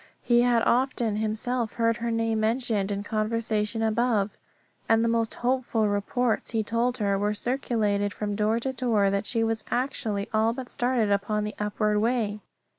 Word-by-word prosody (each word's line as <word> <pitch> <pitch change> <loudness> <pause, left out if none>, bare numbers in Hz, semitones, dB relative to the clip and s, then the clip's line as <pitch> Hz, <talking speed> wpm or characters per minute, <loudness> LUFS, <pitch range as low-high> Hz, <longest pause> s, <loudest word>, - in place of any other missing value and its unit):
He 240 -1 +4
had 240 -1 +3
often 240 -4 +1
himself 220 +2 -1
heard 230 -1 +1
her 235 0 -3
name 225 -1 0
mentioned 220 -3 0
in 200 0 -2
conversation 220 0 -1
above; 220 -2 +1 0.5
and 225 0 +4
the - - +2
most 230 -1 0
hopeful 245 -3 0
reports, 215 +4 0
he 225 -2 0
told 235 +3 0
her, 200 -2 0
were 210 +1 0
circulated 210 -5 0
from 205 0 -3
door 215 +2 +1
to 265 +2 -2
door 225 -6 +2
that 200 +1 -1
she 230 -2 0
was 225 0 -1
actually 225 -5 -1
all 220 +1 +2
but 255 0 -7
started 240 -5 +1
on 210 0 0
the 210 0 -4
upward 210 0 0
way. 220 -2 0
225 Hz, 170 wpm, -26 LUFS, 210-240 Hz, 0.5 s, He